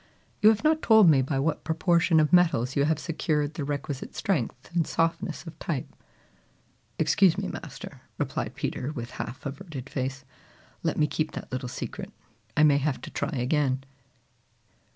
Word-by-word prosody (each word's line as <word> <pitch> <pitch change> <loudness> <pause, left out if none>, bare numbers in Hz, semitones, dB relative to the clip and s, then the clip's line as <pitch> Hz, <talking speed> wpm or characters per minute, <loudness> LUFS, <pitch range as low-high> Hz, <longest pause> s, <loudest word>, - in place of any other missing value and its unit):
"You 210 - +8
have 220 +2 +2
not 310 0 +3
told 220 -4 +7
me 135 -3 +4
by 135 +1 -1
what 150 +4 0
proportion 165 0 +3
of 155 +2 +2
metals 160 -8 +4
you 140 - +3
have 155 0 +2
secured 155 -2 -1
the 150 - -4
requisite 140 -1 -4
strength 150 - -2
and 165 -3 +2
softness 165 +1 -1
of 165 -1 -10
type." 150 -6 -3 1.1
"Excuse 190 -4 +4
me, - - -2
Master," - - -8 0.2
replied - - -3
Peter 130 +4 -3
with 120 -4 -6
half 130 +4 -6
averted 140 -3 -7
face, 135 0 -3 0.6
"let - - -1
me 150 - +4
keep 155 +1 -2
that - - -7
little 130 -1 -3
secret. - - -6 0.5
I 155 - +6
may 145 -2 +5
have 140 -1 -1
to - - -8
try - - -2
again." 135 -1 0
150 Hz, 165 wpm, -27 LUFS, 135-165 Hz, 1.1 s, You